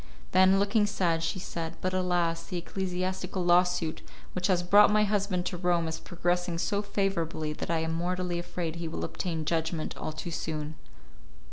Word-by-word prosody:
Then, 190 +1 +6
looking 205 +1 +3
sad, 175 -5 +1
she 165 +3 -1
said, 165 -3 -5
"But 185 0 -1
alas! 175 -2 +1
the 180 - -3
ecclesiastical 185 +1 -2
lawsuit 175 -2 +3 0.3
which 180 0 0
has 180 -3 +2
brought 205 +4 +7
my 210 0 +4
husband 200 -3 0
to 180 - -2
Rome 175 -2 +1
is 160 0 -3
progressing 175 0 -1
so 200 +4 0
favourably 170 -6 -1
that - - -6
I 165 -1 +1
am 160 0 -1
mortally 175 +1 -1
afraid 170 -1 -4
he 170 0 -3
will 160 - -3
obtain 165 -4 -3
judgment 160 0 -1
all - - -4
too 155 +2 -6
soon." 155 -1 -3
175 Hz, 170 wpm, -29 LUFS, 165-185 Hz, 0.3 s, brought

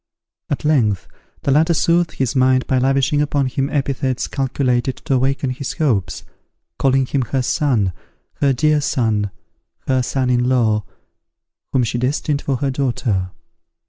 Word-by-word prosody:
At 145 - -2
length 115 -11 +2 0.4
the 140 - +1
latter 160 +4 +3
soothed 170 +2 +2
his 135 0 -1
mind 130 0 +3
by 130 - +1
lavishing 135 +2 +2
upon 145 -2 +1
him 135 +2 -1
epithets 135 -3 -1
calculated 130 -2 -1
to - - 0
awaken 135 +1 +1
his 130 +1 -4
hopes, 125 - -1 0.6
calling 135 -1 +3
him 135 +1 -1
her 130 +3 -1
son, 115 -7 +1 0.4
her 140 -1 +2
dear 150 +3 +2
son, 110 -7 0 0.6
her 130 -1 +2
son 130 0 0
in 125 0 +2
law, 110 -5 +2 0.9
whom 130 - +2
she 120 +1 -1
destined 140 +3 -1
for 135 - -1
her 135 +2 -1
daughter. 120 -8 -1
130 Hz, 145 wpm, -19 LUFS, 125-140 Hz, 0.9 s, latter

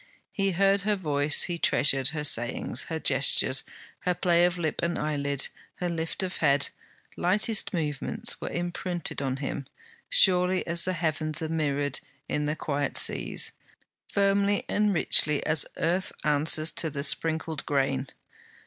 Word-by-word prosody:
He 195 -1 -1
heard 195 +2 +3
her 210 +1 0
voice, 150 -5 +1
he 175 -2 -3
treasured 135 -4 +2
her 150 +1 -3
sayings; 120 -1 -1
her 160 -1 -4
gestures, 135 -2 +2 0.4
her 180 -1 -1
play 175 -1 +3
of 180 0 0
lip 160 -3 -2
and 170 0 -1
eyelid, 140 -2 -1 0.3
her 180 - -3
lift 165 +2 -3
of 185 -1 -4
head, 140 -2 +2 0.5
lightest 205 +4 +2
movements, 150 -6 -2
were - - -4
imprinted 175 -2 -3
on 135 -1 -2
him, 140 0 -5 0.4
surely 185 - +4
as 170 0 0
the 185 - -1
heavens 155 -2 -2
are 160 - -3
mirrored 145 -3 0 0.3
in 150 0 -1
the 150 - -1
quiet 145 -2 -2
seas, - - +1 0.6
firmly 200 0 +2
and 210 0 +1
richly 150 -4 +3
as 155 -2 +2
earth 180 +3 -1
answers 155 +2 +3
to 160 - +1
the 140 -1 -4
sprinkled 160 0 +1
grain. 135 -1 0
160 Hz, 150 wpm, -27 LUFS, 145-180 Hz, 0.6 s, surely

